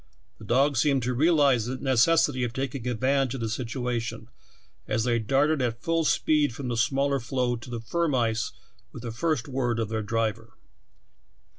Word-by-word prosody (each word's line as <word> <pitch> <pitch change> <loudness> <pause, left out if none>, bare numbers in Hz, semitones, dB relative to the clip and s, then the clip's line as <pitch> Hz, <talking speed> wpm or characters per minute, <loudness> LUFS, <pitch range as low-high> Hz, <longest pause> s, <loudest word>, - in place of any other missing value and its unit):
The 110 - -11
dogs 135 +3 +2
seemed 140 -4 +2
to 125 +2 -1
realize 140 -5 +3
the 130 - -3
necessity 130 +1 +3
of 120 -1 -2
taking 130 -1 -4
advantage 130 +2 +1
of 130 - -5
the 115 - -2
situation, 115 -1 -3 0.6
as 110 +1 0
they 120 -1 +1
darted 140 +6 +2
at 115 -1 -2
full 165 -1 +1
speed 150 -5 +2
from 130 -2 -5
the 120 - -1
smaller 140 +4 +1
floe 125 0 -1
to 115 +2 -11
the 120 -2 -5
firm 160 +5 0
ice 115 -2 0 0.4
with 125 - -10
the 120 - -4
first 150 +1 -1
word 125 -3 -1
of 115 -2 -2
their 110 0 -2
driver. 115 +1 -2
125 Hz, 175 wpm, -26 LUFS, 115-140 Hz, 0.6 s, realize